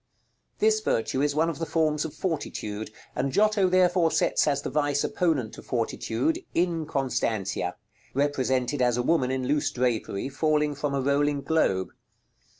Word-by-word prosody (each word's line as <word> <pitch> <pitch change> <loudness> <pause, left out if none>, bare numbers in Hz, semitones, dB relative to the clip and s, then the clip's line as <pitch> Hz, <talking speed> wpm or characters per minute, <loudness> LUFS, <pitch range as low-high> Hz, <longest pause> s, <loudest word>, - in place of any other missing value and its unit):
This 215 0 +3
virtue 130 - 0
is 145 0 +1
one 160 +2 +3
of 165 -3 -3
the 165 - -1
forms 155 -2 +1
of 160 - -7
fortitude, 110 - -3 0.3
and 135 +2 -1
Giotto 210 +2 +3
therefore 180 -2 +4
sets - - +2
as 140 -1 +1
the - - -4
vice 145 -1 +1
opponent 150 -11 0
to - - -9
Fortitude, 120 - -1 0.2
"Inconstantia," 135 - -1 0.4
represented 130 -1 0
as 120 -1 +2
a 125 - 0
woman 130 -3 +2
in 130 -1 -1
loose 145 +2 +1
drapery, 120 -4 -1
falling 150 +1 +1
from 145 0 -2
a 135 - 0
rolling 140 +1 +1
globe. 135 -12 +1
145 Hz, 150 wpm, -26 LUFS, 130-160 Hz, 0.4 s, therefore